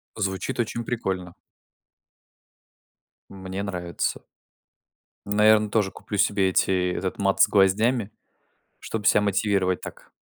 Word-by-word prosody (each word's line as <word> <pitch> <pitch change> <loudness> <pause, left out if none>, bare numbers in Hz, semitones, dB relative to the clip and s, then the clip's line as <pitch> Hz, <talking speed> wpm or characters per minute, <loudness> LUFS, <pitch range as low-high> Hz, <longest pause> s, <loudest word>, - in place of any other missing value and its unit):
Звучит 95 0 -3
очень 115 0 -2
прикольно. 95 -7 -3 2.0
Мне 95 0 -6
нравится. 90 -3 -3 1.0
Наверно, 105 +1 +4
тоже 100 -3 0
куплю 105 - -7
себе 100 -1 +2
эти 90 -1 +1
этот 95 0 -3
мат 100 -1 +1
с - - +7
гвоздями, 105 +3 +2 0.7
чтобы 110 -2 -5
себя 105 - +5
мотивировать 100 -2 0
так. - - -11
100 Hz, 105 wpm, -24 LUFS, 95-105 Hz, 2.0 s, с